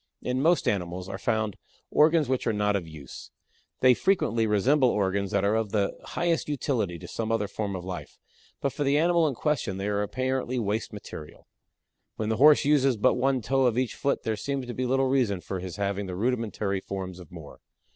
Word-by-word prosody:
In 125 Hz, +1 st, -1 dB
most 170 Hz, +4 st, +3 dB
animals 90 Hz, -2 st, -2 dB
are 95 Hz, -, -6 dB
found 110 Hz, -2 st, -1 dB, 0.3 s
organs 155 Hz, -1 st, +4 dB
which 130 Hz, -1 st, -1 dB
are 115 Hz, -, +2 dB
not 105 Hz, 0 st, +1 dB
of 90 Hz, -4 st, -2 dB
use. 75 Hz, -4 st, -10 dB, 0.5 s
They 130 Hz, -1 st, +7 dB
frequently 115 Hz, -, +1 dB
resemble 125 Hz, +6 st, +3 dB
organs 100 Hz, -2 st, 0 dB
that 95 Hz, -, +1 dB
are 100 Hz, -, +2 dB
of 110 Hz, -1 st, 0 dB
the 100 Hz, -2 st, 0 dB
highest 170 Hz, -3 st, -1 dB
utility 120 Hz, -, -1 dB
to 90 Hz, -, -10 dB
some 110 Hz, +4 st, -3 dB
other 110 Hz, -2 st, 0 dB
form 100 Hz, -1 st, -4 dB
of 90 Hz, -1 st, -6 dB
life, 95 Hz, -1 st, -7 dB, 0.4 s
but 140 Hz, -2 st, -1 dB
for 145 Hz, -, -2 dB
the 140 Hz, +1 st, +3 dB
animal 170 Hz, 0 st, +3 dB
in 140 Hz, -, -2 dB
question 125 Hz, -9 st, -1 dB
they 100 Hz, +1 st, -3 dB
are 105 Hz, 0 st, 0 dB
apparently 130 Hz, +3 st, -2 dB
waste 110 Hz, -1 st, -1 dB
material. 80 Hz, -7 st, -10 dB, 0.7 s
When 110 Hz, 0 st, -3 dB
the 110 Hz, -, 0 dB
Horse 150 Hz, +1 st, +6 dB
uses 135 Hz, -4 st, +3 dB
but 105 Hz, -, +4 dB
one 130 Hz, -1 st, +1 dB
toe 135 Hz, +1 st, +2 dB
of 120 Hz, -1 st, 0 dB
each 130 Hz, -2 st, 0 dB
foot 140 Hz, -, -1 dB
there 110 Hz, -, -1 dB
seems 135 Hz, +5 st, -3 dB
to 120 Hz, -, -6 dB
be 130 Hz, +1 st, -2 dB
little 135 Hz, +1 st, +2 dB
reason 125 Hz, -8 st, +1 dB
for 95 Hz, +1 st, -5 dB
his 90 Hz, -1 st, -6 dB
having 100 Hz, 0 st, -2 dB
the 90 Hz, -, -5 dB
rudimentary 110 Hz, -3 st, -1 dB
forms 95 Hz, -2 st, -6 dB
of 90 Hz, -4 st, -13 dB
more. 80 Hz, -5 st, -11 dB
110 Hz, 205 wpm, -27 LUFS, 100-135 Hz, 0.7 s, They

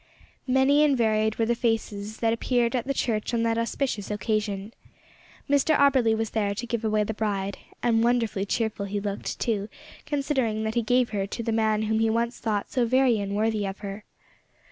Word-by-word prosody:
Many 265 Hz, +3 st, +4 dB
and 285 Hz, -3 st, +3 dB
varied 220 Hz, -1 st, +2 dB
were 225 Hz, -, +2 dB
the 235 Hz, -, +2 dB
faces 220 Hz, -3 st, -2 dB
that 225 Hz, -1 st, +3 dB
appeared 235 Hz, +1 st, +1 dB
at 245 Hz, 0 st, -2 dB
the 275 Hz, -, +1 dB
church 225 Hz, -1 st, -1 dB
on 230 Hz, -, +1 dB
that 230 Hz, 0 st, +1 dB
auspicious 230 Hz, -3 st, -2 dB
occasion. 210 Hz, 0 st, -2 dB, 0.7 s
Mr 285 Hz, +2 st, +3 dB
Auberly 260 Hz, -6 st, +4 dB
was 225 Hz, -1 st, -2 dB
there 205 Hz, -2 st, 0 dB
to 240 Hz, +3 st, -4 dB
give 235 Hz, -1 st, -3 dB
away 215 Hz, -1 st, +2 dB
the 220 Hz, -, -3 dB
bride, 200 Hz, -2 st, -2 dB, 0.2 s
and 230 Hz, -2 st, +3 dB
wonderfully 230 Hz, -5 st, +1 dB
cheerful 215 Hz, -2 st, -1 dB
he 205 Hz, +1 st, -2 dB
looked, 200 Hz, 0 st, -4 dB
too, 215 Hz, -3 st, -1 dB, 0.4 s
considering 270 Hz, -7 st, 0 dB
that 220 Hz, 0 st, -2 dB
he 235 Hz, -, +1 dB
gave 245 Hz, +1 st, +2 dB
her 200 Hz, -2 st, -1 dB
to 230 Hz, -, -5 dB
the 230 Hz, -, -1 dB
man 220 Hz, -1 st, +1 dB
whom 220 Hz, 0 st, 0 dB
he 225 Hz, 0 st, +2 dB
once 235 Hz, +2 st, -1 dB
thought 210 Hz, -3 st, -2 dB
so 250 Hz, -, +1 dB
very 250 Hz, -1 st, +3 dB
unworthy 210 Hz, +2 st, 0 dB
of 195 Hz, +1 st, -7 dB
her. 200 Hz, +1 st, -6 dB
225 Hz, 190 wpm, -26 LUFS, 210-240 Hz, 0.7 s, Many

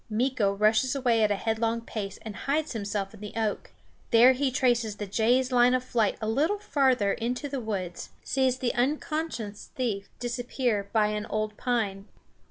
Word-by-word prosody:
Meeko 230 Hz, -2 st, +1 dB
rushes 215 Hz, +6 st, +2 dB
away 245 Hz, -4 st, +2 dB
at 215 Hz, -, +4 dB
a 205 Hz, -, +2 dB
headlong 225 Hz, +2 st, 0 dB
pace 205 Hz, -4 st, -5 dB
and 215 Hz, -2 st, -7 dB
hides 295 Hz, +7 st, -1 dB
himself 200 Hz, -2 st, -3 dB
in 215 Hz, -, -13 dB
the 210 Hz, 0 st, -8 dB
oak. 220 Hz, -2 st, -2 dB, 0.4 s
There 235 Hz, +2 st, +7 dB
he 270 Hz, +1 st, 0 dB
traces 240 Hz, -4 st, +1 dB
the 210 Hz, -, -5 dB
jay's 240 Hz, +6 st, +2 dB
line 250 Hz, 0 st, +5 dB
of 255 Hz, -, -1 dB
flight 225 Hz, -5 st, 0 dB
a 215 Hz, -, -3 dB
little 305 Hz, -, +1 dB
farther 260 Hz, -, +2 dB
into 245 Hz, +5 st, -3 dB
the 275 Hz, -2 st, -4 dB
woods; 190 Hz, -6 st, -4 dB
sees 260 Hz, -2 st, +1 dB
the 255 Hz, -2 st, -1 dB
unconscious 270 Hz, -4 st, -2 dB
thief 210 Hz, -6 st, -2 dB
disappear 240 Hz, -3 st, -2 dB
by 215 Hz, -2 st, +3 dB
an 210 Hz, 0 st, -3 dB
old 215 Hz, 0 st, -2 dB
pine. 210 Hz, -6 st, -1 dB
230 Hz, 175 wpm, -27 LUFS, 210-255 Hz, 0.4 s, There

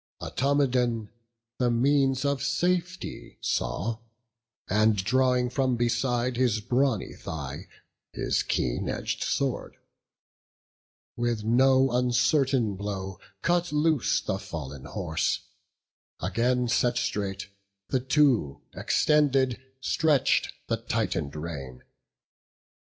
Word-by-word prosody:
Automedon 125 Hz, -5 st, +1 dB, 0.5 s
the 125 Hz, -1 st, +2 dB
means 135 Hz, +2 st, +2 dB
of 140 Hz, -1 st, 0 dB
safety 175 Hz, +6 st, -2 dB
saw; 115 Hz, 0 st, -1 dB, 0.7 s
And 110 Hz, +2 st, +3 dB
drawing 125 Hz, +4 st, +2 dB
from 130 Hz, -1 st, +1 dB
beside 120 Hz, +1 st, 0 dB
his 120 Hz, -4 st, +2 dB
brawny 125 Hz, 0 st, 0 dB
thigh 80 Hz, +2 st, -6 dB, 0.4 s
His -, -, 0 dB
keen -, -, -1 dB
edg'd -, -, -3 dB
sword, -, -, -2 dB, 1.4 s
with 120 Hz, -2 st, -1 dB
no 130 Hz, +3 st, +4 dB
uncertain 125 Hz, -1 st, +2 dB
blow 95 Hz, -2 st, -5 dB, 0.2 s
Cut 175 Hz, -1 st, +1 dB
loose 150 Hz, -2 st, +2 dB
the 95 Hz, -, -2 dB
fallen 70 Hz, -7 st, -7 dB
horse; 85 Hz, -6 st, -1 dB, 0.8 s
again 125 Hz, +1 st, +1 dB
set 120 Hz, +1 st, +2 dB
straight, 95 Hz, -3 st, -2 dB, 0.4 s
The 130 Hz, -, +1 dB
two, 130 Hz, -, +2 dB
extended, 135 Hz, -5 st, +2 dB, 0.2 s
stretch'd 150 Hz, -1 st, +2 dB, 0.2 s
the -, -, 0 dB
tightened 70 Hz, -, -2 dB
rein. 70 Hz, -5 st, -6 dB
125 Hz, 95 wpm, -27 LUFS, 105-135 Hz, 1.4 s, no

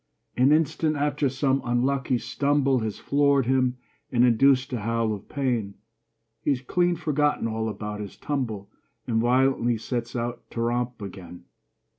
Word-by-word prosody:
An 130 Hz, +3 st, +4 dB
instant 155 Hz, 0 st, +2 dB
after 145 Hz, -1 st, 0 dB
some 135 Hz, +1 st, +1 dB
unlucky 130 Hz, +2 st, +1 dB
stumble 135 Hz, +2 st, +1 dB
Has 110 Hz, -2 st, -3 dB
floored 140 Hz, -2 st, +2 dB
him 130 Hz, 0 st, +1 dB, 0.3 s
and 125 Hz, -1 st, +4 dB
induced 130 Hz, +3 st, +3 dB
a 120 Hz, -, -1 dB
howl 115 Hz, 0 st, 0 dB
of 100 Hz, -, -9 dB
pain, 120 Hz, -8 st, -1 dB, 0.7 s
He's 140 Hz, -3 st, +1 dB
clean 175 Hz, +7 st, +1 dB
forgotten 150 Hz, -5 st, 0 dB
all 110 Hz, 0 st, -2 dB
about 105 Hz, 0 st, -5 dB
his 105 Hz, -2 st, -7 dB
tumble 110 Hz, -9 st, -3 dB, 0.3 s
And 115 Hz, -3 st, +1 dB
violently 125 Hz, -1 st, +2 dB
sets 120 Hz, +2 st, -4 dB
out 120 Hz, 0 st, -3 dB
to 115 Hz, -, -4 dB
romp 120 Hz, -1 st, -1 dB
again. 90 Hz, -3 st, -9 dB
125 Hz, 145 wpm, -25 LUFS, 115-140 Hz, 0.7 s, An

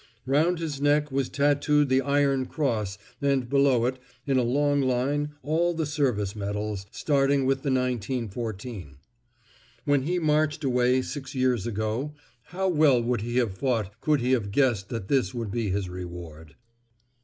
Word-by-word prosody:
Round 155 Hz, +7 st, +2 dB
his 155 Hz, -4 st, -4 dB
neck 145 Hz, 0 st, +2 dB
was 135 Hz, -1 st, 0 dB
tatooed 145 Hz, +1 st, +2 dB
the 130 Hz, 0 st, +3 dB
Iron 140 Hz, -2 st, +1 dB
Cross 110 Hz, -10 st, -1 dB, 0.2 s
and 140 Hz, -3 st, +1 dB
below 135 Hz, -3 st, +3 dB
it, 130 Hz, +1 st, -1 dB, 0.3 s
in 135 Hz, -2 st, +2 dB
a -, -, +2 dB
long 145 Hz, +3 st, +2 dB
line, 140 Hz, +3 st, 0 dB
all 165 Hz, +4 st, +1 dB
the 160 Hz, -1 st, -1 dB
service 125 Hz, -9 st, -1 dB
medals, 105 Hz, -1 st, -4 dB
starting 140 Hz, 0 st, +1 dB
with 135 Hz, 0 st, +2 dB
the 140 Hz, -, -2 dB
1914. 115 Hz, -, -3 dB, 0.9 s
When 145 Hz, -2 st, +3 dB
he 175 Hz, +7 st, -1 dB
marched 155 Hz, -2 st, +1 dB
away 125 Hz, -1 st, +2 dB
six 135 Hz, -1 st, -7 dB
years 125 Hz, -5 st, +1 dB
ago, 115 Hz, +7 st, -2 dB, 0.3 s
how 190 Hz, +2 st, -2 dB
well 150 Hz, -7 st, +4 dB
would 120 Hz, -1 st, 0 dB
he 120 Hz, +2 st, -3 dB
have 115 Hz, -7 st, +1 dB
fought 115 Hz, -3 st, -2 dB
could 150 Hz, -3 st, +2 dB
he 125 Hz, +2 st, 0 dB
have 115 Hz, -6 st, +1 dB
guessed 115 Hz, -4 st, +1 dB
that 115 Hz, -6 st, -5 dB
this 130 Hz, 0 st, +1 dB
would 115 Hz, -4 st, -3 dB
be 115 Hz, -1 st, -1 dB
his 95 Hz, 0 st, -1 dB
reward? 85 Hz, -3 st, -9 dB
130 Hz, 160 wpm, -26 LUFS, 110-145 Hz, 0.9 s, well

